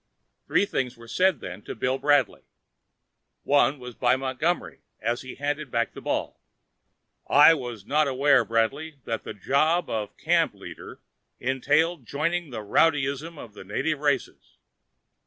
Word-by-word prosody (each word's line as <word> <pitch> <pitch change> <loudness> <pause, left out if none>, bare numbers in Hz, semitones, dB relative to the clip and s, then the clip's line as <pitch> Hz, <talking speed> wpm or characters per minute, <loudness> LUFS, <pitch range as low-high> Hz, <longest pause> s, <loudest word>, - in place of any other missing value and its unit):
Three - - +3
things 125 -10 -3
were 115 0 -13
said 185 +9 +2
then 95 - -7
to - - -7
Bill 130 +4 -1
Bradley. 140 -4 +2 1.0
One 145 0 +3
was 125 -1 -9
by 125 +2 +2
Montgomery 135 +6 -2 0.2
as 120 +2 -1
he 130 - -9
handed 145 0 -3
back 115 -1 -1
the - - -9
ball. - - -3 0.9
"I 150 +3 +7
was 120 -8 -6
not 150 +3 +2
aware, 135 -1 +4
Bradley, 115 +8 -1
that 115 -1 -3
the 110 - -6
job 155 - +1
of 105 -2 -4
camp - - +1
leader - - -11 0.4
entailed 145 +3 +1
joining 165 +3 -1
the 110 -4 -6
rowdyism 145 +6 +1
of 115 -6 -10
the 105 - -11
native 140 +10 -2
races." 145 -3 -2
135 Hz, 145 wpm, -26 LUFS, 120-150 Hz, 1.0 s, I